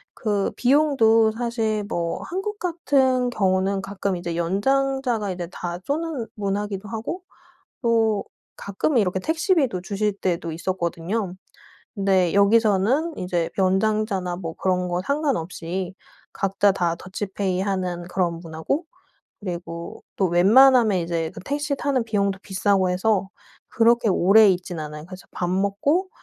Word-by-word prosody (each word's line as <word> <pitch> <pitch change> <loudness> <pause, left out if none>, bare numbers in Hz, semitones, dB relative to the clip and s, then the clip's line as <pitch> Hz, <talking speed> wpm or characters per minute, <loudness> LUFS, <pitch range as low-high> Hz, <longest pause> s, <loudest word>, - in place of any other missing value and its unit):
그 205 -3 0
비용도 240 -5 +4
사실 225 -2 -1
뭐 170 -3 -2
한국 400 +3 -4
같은 270 -8 +1
경우는 195 -3 +1
가끔 195 -1 -2
이제 175 -1 -4
연장자가 245 +5 0
이제 180 -2 -4
다 175 -1 -5
쏘는 300 -4 -2
문화기도 205 0 -3
하고 230 +11 -4 0.6
또 225 -3 +2 0.3
가끔은 225 +6 0
이렇게 190 -2 0
택시비도 320 - +1
주실 205 +1 -1
때도 170 -3 -1
있었거든요. 175 +3 -2 0.6
근데 190 -4 +2
여기서는 220 - +3
이제 175 -2 -1
연장자나 190 -1 +1
뭐 165 -3 -5
그런 180 -1 0
거 175 +1 -1
상관없이 190 - -2 0.4
각자 195 +1 +2
다 175 -3 0
더치페이 190 0 -3
하는 185 -3 -2
그런 175 -3 -1
문화고 165 - -3 0.6
그리고 170 -3 -6 0.2
또 190 - +2
웬만하면 220 +5 +6
이제 165 -1 -2
그 - - -9
택시 290 +4 -2
타는 275 -3 0
비용도 200 -3 0
비싸고 190 -1 +1
해서 190 +1 +1 0.4
그렇게 230 -1 +3
오래 200 +4 +6
있진 180 -2 -2
않아요. 150 0 -7
그래서 185 0 -12
밥 175 - -3
먹고 205 - +1
200 Hz, 290 characters per minute, -23 LUFS, 180-235 Hz, 0.6 s, 웬만하면